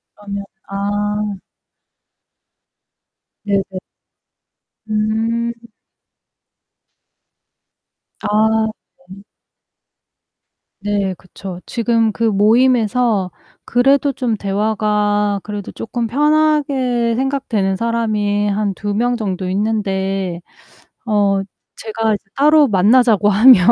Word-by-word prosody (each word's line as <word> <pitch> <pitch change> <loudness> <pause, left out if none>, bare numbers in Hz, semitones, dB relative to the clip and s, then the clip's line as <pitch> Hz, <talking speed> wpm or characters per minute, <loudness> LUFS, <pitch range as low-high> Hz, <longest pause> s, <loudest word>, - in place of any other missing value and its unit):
그러면 200 -1 -6 0.2
아. 205 0 -2 2.0
네네. 200 -1 +2 1.3
음. 225 +2 0 2.7
아 - - -3 0.8
네. 195 +1 -12 1.6
네 200 -2 -1
그쵸. 185 0 -9
지금 230 -2 +1
그 230 - -4
모임에서 220 -1 +2 0.3
그래도 275 +3 +3
좀 245 -4 -1
대화가 205 0 0
그래도 205 -2 -6
쪼끔 230 0 -4
편하게 280 -4 +1
생각되는 245 -8 -1
사람이 210 -3 0
한 200 -1 -1
2 205 +2 -4
명 245 +3 +1
정도 190 -4 -3
있는데 195 -3 -1 0.7
어 200 -2 +2 0.4
제가 220 0 -2
이제 200 - -7
따로 300 +1 +5
만나자고 210 +1 +4
하면 220 +3 +7
210 Hz, 155 characters per minute, -18 LUFS, 200-235 Hz, 2.7 s, 하면